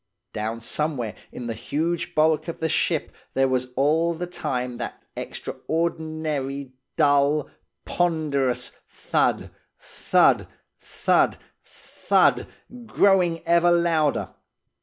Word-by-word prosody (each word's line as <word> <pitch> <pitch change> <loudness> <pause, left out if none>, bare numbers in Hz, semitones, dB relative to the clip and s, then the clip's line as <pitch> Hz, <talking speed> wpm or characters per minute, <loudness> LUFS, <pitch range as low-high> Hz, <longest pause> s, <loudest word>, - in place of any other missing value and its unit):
"Down 110 +2 -3
somewhere 130 -3 -2 0.2
in 125 - -7
the 115 - -3
huge 155 +9 -2
bulk 155 +1 +3
of 165 - -5
the 160 - 0
ship - - 0 0.2
there 135 0 +3
was 130 -1 0
all 160 +5 +2
the 175 +2 -4
time 125 -8 -3
that - - -6
extraordinary 155 -5 -3 0.2
dull, 145 +1 +3 0.3
ponderous 150 -7 0 0.2
thud, - - -1 0.3
thud, - - +2 0.3
thud, - - +1 0.3
thud - - +1 0.4
growing 180 -6 +3
ever 170 +1 +4
louder. 170 -4 +1
155 Hz, 100 wpm, -24 LUFS, 135-165 Hz, 0.4 s, ever